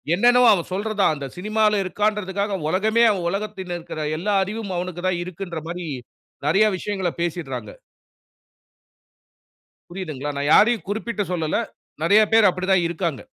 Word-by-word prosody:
என்னென்னவோ, 245 +5 +5
அவன் 175 -4 -2
சொல்றத 210 +2 -3
தான் 175 - +4
அந்த 140 -2 -6
சினிமால 210 +2 +1
இருக்கான்றதுக்காக, 200 0 -1
உலகமே 215 +7 +2
அவன் 180 -4 -2
உலகத்தில 190 -3 -4
இருக்கிற 155 -2 -6
எல்லா 200 +5 0
அறிவும் 205 0 -5
அவனுக்கு 175 0 -5
தான் 180 -2 0
இருக்குன்ற 175 -1 -6
மாரி 175 0 -5 0.6
நெறைய 195 +8 +4
விஷயங்கள 190 -1 -2
பேசிடுறாங்க. 135 -10 -4 2.2
புரியுதுங்களா? 155 -6 -5
நான் 145 +1 0
யாரையும் 220 0 +4
குறிப்பிட்டு 215 +1 -2
சொல்லல. 160 -3 -1 0.5
நெறைய 205 +6 +6
பேர் 220 -2 +6
அப்புடி 185 +1 -5
தான் 185 -2 +3
இருக்காங்க. 170 -5 -3
190 Hz, 135 wpm, -22 LUFS, 170-210 Hz, 2.2 s, நெறைய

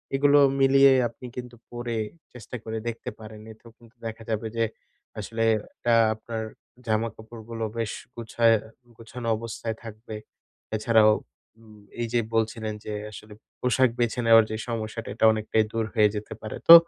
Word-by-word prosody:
এগুলো 145 +1 +5 0.2
মিলিয়ে 135 0 +7 0.2
আপনি 115 +2 -13
কিন্তু 125 -1 -7 0.2
পরে 120 -1 -3 0.4
চেষ্টা 125 0 -9
করে 110 0 -4
দেখতে 115 0 -4
পারেন। 110 0 -10
এতেও 110 +1 -15
কিন্তু 115 0 -20
দেখা 115 0 -5
যাবে 110 0 -1
যে, 115 - +3 0.6
আসলে 115 0 -2 0.3
এটা 120 - +1 0.2
আপনার 110 0 -5 0.4
জামাকাপড়গুলো 110 +1 -3
বেশ 115 -3 -1 0.2
গোছা 115 0 -2 0.5
গোছানো 115 +1 -7
অবস্থায় 115 0 -4
থাকবে। 110 0 -8 0.6
এছাড়াও, 110 0 +5 0.5
উম 110 -2 -16 0.2
এই 120 - 0
যে 120 - +4 0.2
বলছিলেন 110 -1 0
যে 105 - -4 0.2
আসলে 105 0 -11 0.3
পোশাক 125 0 +3
বেছে 120 0 +1
নেওয়ার 115 -1 +8
যে 110 - -1
সমস্যাটা 115 0 -4
এটা - - +3
অনেকটাই 110 0 +1
দূর 115 -1 -1
হয়ে 105 -2 +5
যেতে 105 +1 -5
পারে। 110 - -5
তো 165 - +13
115 Hz, 150 wpm, -26 LUFS, 110-120 Hz, 0.6 s, তো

